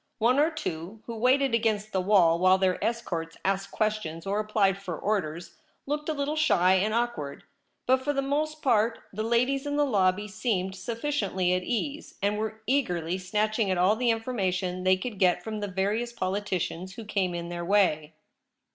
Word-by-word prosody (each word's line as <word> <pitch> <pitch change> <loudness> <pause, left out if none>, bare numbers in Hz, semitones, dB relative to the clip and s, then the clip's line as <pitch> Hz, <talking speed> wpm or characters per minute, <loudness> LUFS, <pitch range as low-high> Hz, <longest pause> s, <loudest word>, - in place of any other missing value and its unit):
One 245 +5 +3
or 305 +2 +4
two, 205 - -6
who 230 - -6
waited 260 +3 +3
against 215 -2 +1
the 190 - 0
wall 180 -4 +4
while 185 +1 +5
their 185 -1 0
escorts 170 -9 -3
asked 195 0 0
questions 215 -7 -2
or 200 +2 0
applied 210 -3 +1
for 180 -5 -5
orders, 175 -5 -2 0.3
looked 300 +2 -3
a - - +1
little 290 +1 -2
shy 190 - +4
and 195 +3 +2
awkward; 230 -12 -2 0.4
but 260 +1 +3
for 290 - +1
the 275 -1 -1
most 305 +3 -2
part 230 -4 +3 0.2
the 215 - -3
ladies 250 +5 +1
in 290 - -1
the 295 - +3
lobby 200 -4 +1
seemed 190 -3 -2
sufficiently 200 -4 -1
at 180 - +1
ease, 275 +9 -3
and 205 +1 0
were 220 0 -4
eagerly 180 - 0
snatching 215 +3 0
at 185 - +1
all 185 +4 +4
the 240 +1 +1
information 190 -6 -1
they 185 0 +5
could 210 0 -6
get 180 -2 +3
from 215 -1 -4
the 205 - -3
various 205 +5 -1
politicians 190 -3 -3
who 225 - -8
came 190 -4 -1
in 170 0 -5
their 175 0 -4
way. 165 -5 +2
210 Hz, 180 wpm, -27 LUFS, 185-235 Hz, 0.4 s, while